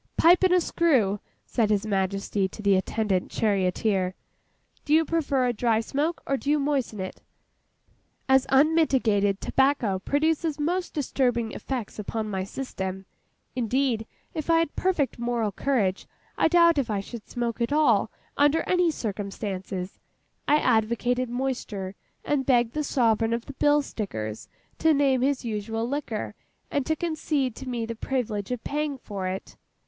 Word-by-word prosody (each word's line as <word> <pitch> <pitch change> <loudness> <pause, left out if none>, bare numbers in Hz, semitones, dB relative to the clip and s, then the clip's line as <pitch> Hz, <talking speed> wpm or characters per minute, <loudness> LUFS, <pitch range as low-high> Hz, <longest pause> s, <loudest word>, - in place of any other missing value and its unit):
'Pipe 345 +2 +6
and 370 - +3
a - - +5
screw!' 260 - +2 0.3
said 225 -4 +1
His 210 0 +1
Majesty 195 -1 0
to 210 +3 -10
the 200 -1 +4
attendant 190 0 0
charioteer. 190 -2 0 0.7
'Do 300 - +3
you 325 0 +4
prefer 280 -5 +1
a 245 - +1
dry 230 -1 +2
smoke, 295 +8 -2
or 275 - 0
do 280 - -4
you 300 - +4
moisten 275 -7 -1
it?' 185 0 -6 1.1
As 265 -1 +4
unmitigated 265 -9 +3
tobacco 265 -8 +1
produces 310 - 0
most 350 +4 -1
disturbing 245 -6 0
effects 245 -6 -5
upon 215 +1 -3
my 190 -1 -1
system 190 -4 -5 0.5
(indeed, 245 -1 0 0.3
if 310 0 -4
I 330 - +5
had 330 -2 0
perfect 335 -10 0
moral 235 -3 0
courage, 205 -4 0 0.3
I - - +3
doubt 335 -2 +5
if 255 -4 -1
I 205 -2 0
should 210 +2 -8
smoke 240 -1 -3
at 235 - 0
all, 305 +1 +3 0.3
under 290 +3 +4
any 360 -2 +3
circumstances), 195 - -4 0.5
I 295 - +5
advocated 245 0 +1
moisture, 235 -7 -3 0.3
and 290 -2 +1
begged 240 -3 +2
the 305 - -1
Sovereign 230 -4 +2
of 235 0 -2
the 280 - -8
Bill 290 +2 +3
Stickers 110 - -5 0.3
to 320 -1 +4
name 270 -3 +3
his 270 -1 0
usual 225 +1 -2
liquor, 245 -6 -3 0.4
and 280 -2 -1
to 315 - +2
concede 305 -7 -1
to 265 - -6
me 235 -2 -2
the 230 - -4
privilege 220 -4 -2
of 250 -2 -3
paying 295 -1 -2
for 200 -6 -5
it. 190 +1 -6
245 Hz, 155 wpm, -26 LUFS, 210-285 Hz, 1.1 s, Pipe